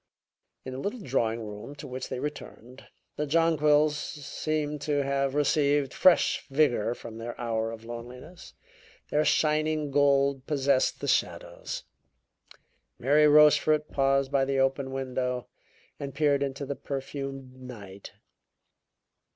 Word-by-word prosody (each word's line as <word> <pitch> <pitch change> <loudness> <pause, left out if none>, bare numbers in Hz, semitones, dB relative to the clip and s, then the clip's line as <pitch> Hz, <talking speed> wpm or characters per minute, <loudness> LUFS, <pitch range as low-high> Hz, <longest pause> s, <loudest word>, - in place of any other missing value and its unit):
In 130 - -6
the 130 - -5
little 210 - -4
drawing 115 - -1
room 105 +7 -8
to - - -10
which 130 0 -6
they 130 - -4
returned, 130 -3 -8 0.3
the 150 - -1
jonquils 150 -1 +3
seemed 150 0 -3
to 145 -2 0
have 140 0 -1
received 145 -1 +2
fresh 185 -2 +4
vigor 135 -5 +1
from 115 -2 -10
their 120 +1 -7
hour 115 -2 -1
of 115 0 -10
loneliness; 125 +9 -10 0.6
their 150 +1 +3
shining 155 -1 +1
gold 140 -1 +2
possessed 140 -3 +1
the - - -3
shadows. - - -2 1.1
Mary 150 +4 +4
Rochefort 150 0 +5
paused 135 0 +1
by 140 -1 +3
the 135 0 -1
open 135 0 +1
window 125 -2 -3 0.5
and 140 -1 -6
peered 145 -2 +2
into 140 0 -3
the 140 - -4
perfumed 135 -1 -6
night. 100 -6 -10
140 Hz, 125 wpm, -28 LUFS, 130-150 Hz, 1.1 s, Rochefort